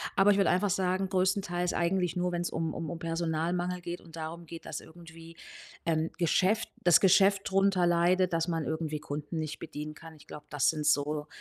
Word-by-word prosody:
Aber 195 +1 +5
ich 200 - +3
würde 195 - +3
einfach 200 +3 +2
sagen, 190 0 0
größtenteils 185 -2 0
eigentlich 180 0 0
nur, 180 0 0
wenn's 175 0 -2
um 160 -1 -2
um 165 - -5
um 170 - -6
Personalmangel 170 +2 -2
geht 175 0 -6
und 165 -2 -14
darum 165 +1 -6
geht, 165 0 -10
dass 150 - -5
irgendwie, 165 0 -14 0.5
ähm, 160 -1 0
Geschäft 190 +5 +2
das 175 -1 +6
Geschäft 195 +1 +4
drunter 195 -2 +3
leidet, 175 +1 +3
dass 165 +1 +1
man 165 -2 -1
irgendwie 160 -1 -3
Kunden 150 +3 -5
nicht 155 -1 -4
bedienen 150 -1 -6
kann. 165 0 -12
Ich 150 - -18
glaube, 150 - -10
das 145 -2 +2
sind 155 -2 -2
so 150 0 +1
170 Hz, 195 wpm, -30 LUFS, 160-185 Hz, 0.5 s, das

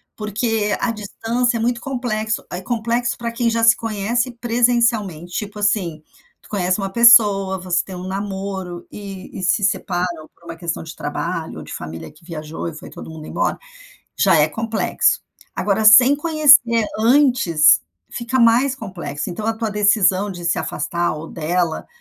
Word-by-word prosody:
Porque 210 0 -1
a 235 - 0
distância 230 +3 -2
é - - -4
muito 235 +1 -1
complexo, 225 -5 -3
é 180 - -5
complexo 235 +3 -1
para 235 0 -4
quem 235 0 0
já 230 0 -1
se 225 0 +7
conhece 225 +3 -2
presencialmente, 235 -7 0
tipo 210 0 -5
assim. 185 -7 -1 0.4
Tu - - -20
conhece 185 -2 0
uma 195 -1 -2
pessoa, 205 -4 +5
você 180 -1 0
tem 190 - -9
um 180 +1 -7
namoro 190 -2 -5
e 195 -1 -9
e - - -6
se 205 +4 +1
separam 175 -4 -2
por 170 - -24
uma 165 - -7
questão 170 -1 -4
de 160 0 -10
trabalho 165 +2 -4
ou - - -9
de - - -9
família 80 - -8
que 155 +2 -23
viajou 160 -1 -6
e 165 - -5
foi 155 - -11
todo - - -10
mundo 160 -1 -9
embora. - - -1 0.6
Já - - +4
é - - +4
complexo. 225 0 0 0.3
Agora, 210 +2 0
sem 250 +6 +8
conhecer 285 -8 +4
antes, 225 - +4 0.3
fica 240 +2 -3
mais 245 +3 +4
complexo. 185 - -6
Então 210 +5 -5
a 225 - +2
tua 220 -1 -2
decisão 205 -1 +2
de 175 -2 -8
se 170 - +1
afastar 175 -1 -2
ou 155 +1 -7
dela 170 +1 -2
205 Hz, 170 wpm, -20 LUFS, 175-235 Hz, 0.6 s, sem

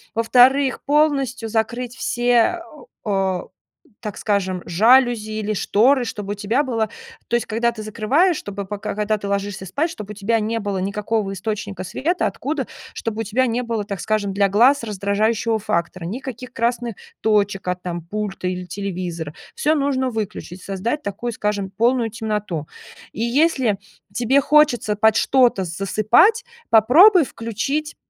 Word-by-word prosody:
Во-вторых, 255 +4 +4
полностью 275 -5 +1
закрыть 235 +2 -2
все, 245 +10 +1 0.4
а, 190 -3 0 0.6
так 210 -3 -6
скажем, 190 -3 -1
жалюзи 225 +4 +4
или 215 0 -2
шторы, 245 +6 +3
чтобы 205 -3 -5
у - - -7
тебя 220 +7 0
было 225 -5 -1 0.4
То 235 - 0
есть, 240 - 0
когда 235 +2 0
ты 215 -2 -7
закрываешь, 275 - +2
чтобы, 200 0 -6
пока, 205 +1 -5
когда 210 +1 0
ты 205 - -6
ложишься 200 -1 -3
спать, 285 - -1
чтобы 210 -8 -8
у - - -15
тебя 220 +3 0
не 220 +2 -1
было 205 -2 -3
никакого 200 +2 -2
источника 200 -1 -4
света, 335 - -1
откуда. 280 0 -3 0.3
Чтобы 225 -1 -4
у - - -1
тебя 235 +5 +1
не 240 0 -1
было, 230 -3 -2
так 200 -2 -5
скажем, 215 -2 -1
для 200 0 +3
глаз 245 +7 +4
раздражающего 215 +2 0
фактора, 170 -3 -2
никаких 250 +5 -6
красных 235 -1 -1 0.3
точек 205 -3 +1
от, 180 0 -2
там, 175 -1 -4
пульта 195 +2 -4
или 180 0 -3
телевизора. 180 -4 -5 0.2
Всё 310 +2 +2
нужно 275 -3 0
выключить, 210 -4 -5
создать 215 +10 -3
такую, 225 +4 -4
скажем, 205 -2 -2
полную 230 +4 +1
темноту. 210 -8 -3 0.4
И - - -6
если 250 -4 +2 0.3
тебе 245 +3 +3
хочется 280 -8 +3
под 220 +1 +3
что-то 245 -8 +3
засыпать, 215 - +3 0.2
попробуй 315 - +7
включить 260 +8 -3
220 Hz, 150 wpm, -21 LUFS, 200-245 Hz, 0.6 s, попробуй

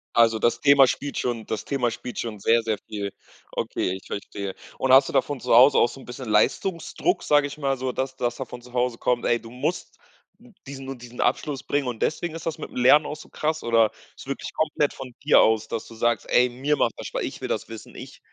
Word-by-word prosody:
Also, 115 -1 +5
das 120 +1 +1
Thema 140 0 +7
spielt 140 +2 -3
schon 115 -3 -2
das 110 - -3
Thema 125 -4 0
spielt 125 +2 -7
schon 110 -3 -4
sehr 115 +3 +3
sehr 110 -1 -1
viel 100 -2 -4 0.4
Okay, - - -2
ich 95 - -13
verstehe. 100 -1 -5 0.2
Und 130 -1 +2
hast 135 0 +7
du - - -5
da - - +4
von 145 -4 -6
Zuhause 130 +4 +6
aus 120 - +4
auch - - -10
so 135 - -11
'n - - -13
bisschen 125 -1 -7
Leistungsdruck, 170 - +1
sag 145 -1 +3
ich 145 +1 -5
mal 135 -2 0
so, 130 0 -2
dass 130 +1 -3
dass 120 -1 -1
von 125 -2 -7
zu 120 0 -16
Hause 125 -1 0
kommt: 125 -1 0
„Ey, 120 -1 +2
du 115 - -12
musst 145 +8 -4 0.7
diesen 135 -1 -8
und 135 -2 -6
diesen 120 0 -9
Abschluss 145 -3 0
bringen“ 145 -1 -1
und 120 -3 -5
deswegen 165 +1 -1
ist 165 - -7
das 165 - -3
mit - - -6
dem - - -14
Lernen 140 +5 +5
auch 150 - -5
so - - -13
krass 155 +1 -2
oder 115 -2 +3 0.3
ist - - -12
wirklich 140 - -5
komplett 150 -2 0
von 130 -2 -9
dir 150 - +6
aus, 110 0 +3
dass 115 - -4
du - - -12
sagst: 115 0 0
„Ey, 125 0 +4
mir 140 +5 0
macht - - +1
das - - -6
Spa - - -3
ich - - -5
will - - -4
das - - -2
wissen, 115 -1 -10
ich“ - - -10
125 Hz, 245 wpm, -24 LUFS, 115-140 Hz, 0.7 s, Thema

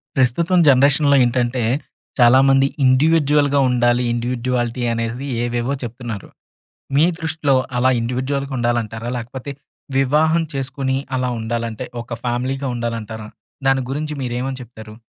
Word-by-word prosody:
ప్రస్తుతం 165 +8 +2
జనరేషన్‌లో 140 +2 +5
ఏంటంటే, 120 0 0 0.6
చాలామంది 135 +3 +5 0.2
ఇండివిడ్యుయల్‌గా 145 +1 +3
ఉండాలి. 120 0 +2
ఇండివిడ్యుయాలిటీ 120 0 -2
అనేది 115 +4 -3 0.2
ఏవేవో 120 +2 -1
చెప్తున్నారు. 115 -3 -6 0.7
మీ 150 - +5
దృష్టిలో 160 -4 0 0.2
అలా 130 +1 +3
ఇండివిడ్యుయల్‌గా 130 +4 -2
ఉండాలంటారా? 120 -1 -1
లేకపోతే 125 +4 -6 0.5
వివాహం 155 +5 +3
చేసుకొని, 135 0 -2 0.2
అలా 125 -1 -1
ఉండాలంటే, 115 0 -3 0.2
ఒక 120 - -20
ఫ్యామిలీ‌గా 130 +3 -2
ఉండాలంటారా? 115 -2 -5 0.4
దాని 135 0 +3
గురించి 150 +2 -3
మీరేమని 130 +2 -3
చెప్తారు? 110 -2 -12
125 Hz, 105 wpm, -20 LUFS, 120-140 Hz, 0.7 s, జనరేషన్‌లో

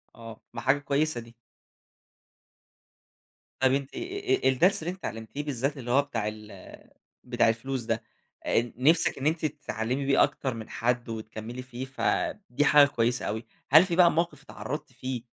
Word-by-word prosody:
آه، 115 -1 -11
ما 120 - -5
حاجة 135 +3 +3
كويسة 145 -1 0
دي. 115 0 -15 2.2
طيب، 130 0 +4
أنتِ 135 0 -2
آآ 390 - 0
الدرس 165 +7 +3
اللي 165 - -2
أنتِ 185 - -9
اتعلّمتيه 115 +6 -5
بالذات 140 0 -2
اللي 120 -2 -5
هو 135 +3 +5
بتاع 115 -7 -3
ال 110 0 -9 0.5
بتاع 120 -2 +2
الفلوس 125 +3 -2
ده 115 0 -2 0.4
آآ، 120 0 +1
نفسِك 160 +6 +4
إن 135 - -5
أنتِ 160 0 0
تتعلّمي 140 -3 -3
بيه 135 0 +5
أكتر 130 -2 -1
من 115 -2 -8
حد، 120 0 -1
وتكملّي 110 +2 -6
فيه 125 0 -7
ف 130 -1 -10 0.5
دي 140 +4 +1
حاجة 145 -1 +7
كويسة 120 -2 0
أوي. 110 +3 -3 0.2
هل 155 +6 +8
في 175 -2 -2
بقى 175 -1 +6
موقِف 170 +2 -1
اتعرّضتِ 130 +9 -6
فيه 125 -1 -5
130 Hz, 165 wpm, -27 LUFS, 115-145 Hz, 2.2 s, هل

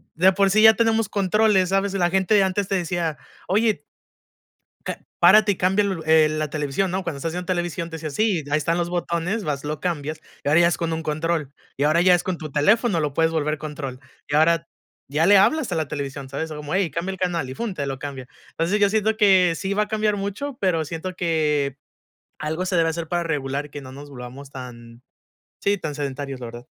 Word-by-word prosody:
de 185 +4 +5
por 195 +1 +3
sí 215 +3 +4
ya 220 0 +9
tenemos 225 -1 +2
controles, 200 -1 +2
¿sabes? 195 +1 +1
La 180 -3 +2
gente 190 +3 +3
antes 190 +1 0
te 195 - 0
decía: 170 -4 -1 0.3
"Oye" 210 -5 +1 1.0
"Ca - - -4 0.2
párate 205 +4 +6
y - - -5
cambia 195 +4 +2 0.2
el 155 -1 +4
la 155 -1 -2
televisión, 150 +5 -1
¿no?". 190 +2 -2
Cuando 170 -5 -4
estás 160 +4 -3
viendo 180 +1 -5
televisión 175 -2 -2
te 165 - -5
decía: 155 -1 -5
"Sí, 190 -1 0
ahí 150 - +3
están 165 +3 0
los 175 0 -1
botones". 175 +4 -2
Vas, 145 -3 -3
lo 150 0 -4
cambias 155 -3 -3 0.2
y - - 0
ahora 155 +3 +5
ya 170 - +5
es 175 - 0
con 165 -1 -2
un 160 0 -2
control 155 -2 -2 0.2
y 140 - 0
ahora 155 +3 +3
ya 180 0 +6
es 175 - +1
con 185 -3 -2
tu 155 -3 -7
teléfono, 205 - +3
lo 150 -2 -2
puedes 165 +1 +2
volver 155 -1 -1
control 145 -4 -6 0.3
y 145 - -3
ahora, 165 +1 +3 0.4
ya 150 +3 +2
le 200 +1 +7
hablas 265 - +2
a - - +1
la 160 -2 -1
televisión, 140 -2 -5
¿sabes? 150 +4 -4
Como: 150 +1 -5
"Hey, 190 -3 +1
cambia 170 +6 -3
el 190 - -8
canal". 170 -6 -1
Y - - -6
fun, 220 - -4
te 140 -5 -3
lo 135 -1 -4
cambia. 135 -2 -7 0.2
Entonces, 175 +6 0
yo 200 - +5
siento 220 +1 +1
que 190 -5 +5
sí 195 +2 -2
va 210 +1 +2
a - - -16
cambiar 215 -1 0
mucho, 205 +8 -4
pero 175 -5 +1
siento 165 +4 -5
que, 150 -5 0 0.6
algo 160 +4 -2
se 185 - -1
debe 165 -1 +3
hacer 165 0 -4
para 175 +1 -1
regular 145 -2 -2
que 145 0 -8
no 130 -1 -10
nos 145 +2 -10
volvamos 130 +1 -9
tan, 120 -2 -10 0.6
sí, 200 0 +1
tan 155 -4 -4
sedentarios, 140 -2 -4
la 120 - -5
verdad. 120 +1 -10
165 Hz, 225 wpm, -23 LUFS, 150-190 Hz, 1.0 s, ya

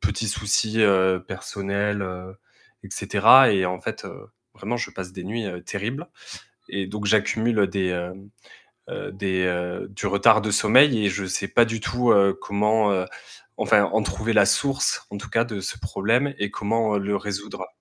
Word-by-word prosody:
petits 105 +1 -2
soucis, 105 +2 0
heu, 95 -3 +3
personnels, 100 +2 -3
heu, 95 0 -7 0.5
et - - -12
cetera. 115 +4 +5
Et 95 -2 +1
en 90 0 -3
fait, - - -6
heu, - - -12 0.3
vraiment 115 +5 -4
je - - -4
passe 90 -1 -8
des 90 -2 -9
nuits, 110 +3 -4
heu, 90 -2 -7
terribles. 120 - -5 0.6
Et 100 -1 -3
donc 105 +1 -6
j'accumule 110 +1 +2
des, 95 -2 -2
hem, 90 +3 -5 0.6
heu - - -6
des 95 -1 -2
heu, 90 0 -3
du 100 +1 -7
retard 110 +3 +4
de 105 0 -2
sommeil 115 +2 +5
et 100 - +3
je 95 0 -3
sais 95 +1 -2
pas 120 - +4
du 115 0 -4
tout, 120 +1 +1
heu, 100 -1 +4
comment, 105 +1 0
heu, 95 -1 -1 0.5
enfin, - - +3
en - - 0
trouver 115 +1 -2
la - - +5
source 140 -1 0
en 100 - -6
tout 110 +3 -9
cas, 115 +2 +2
de 105 -4 -6
ce 95 - -5
problème 120 +8 0
et 105 -1 -2
comment, 110 0 -1
heu, - - 0
le 100 +1 -2
résoudre. 100 -1 -6
100 Hz, 185 wpm, -23 LUFS, 95-110 Hz, 0.6 s, cetera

